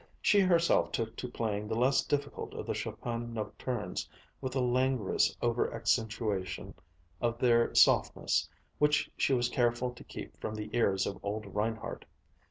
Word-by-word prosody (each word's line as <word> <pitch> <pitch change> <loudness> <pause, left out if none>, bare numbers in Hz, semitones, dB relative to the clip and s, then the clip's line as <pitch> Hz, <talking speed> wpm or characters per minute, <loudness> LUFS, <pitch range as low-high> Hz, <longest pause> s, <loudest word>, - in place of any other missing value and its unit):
She 205 - +4
herself 175 -3 +3
took 115 0 -2
to 125 - -4
playing 105 -3 -2
the 110 - -2
less 130 +3 +3
difficult 145 -1 -3
of - - -5
the - - -1
Chopin 120 -1 -4
nocturnes 105 -1 -4 0.3
with 130 0 -4
a - - +2
languorous 125 -3 +2
over 120 0 +1
accentuation 105 -4 -1 0.5
of 115 -1 0
their 120 -1 +3
softness - - +4 0.3
which 150 0 +3
she - - +2
was 120 -1 +2
careful 120 0 +1
to 120 - -13
keep - - -9
from 110 - -3
the 105 +1 -5
ears 95 -5 +2
of 100 - -5
old 105 +1 -3
Reinhardt. 110 +2 -2
115 Hz, 155 wpm, -31 LUFS, 105-125 Hz, 0.5 s, She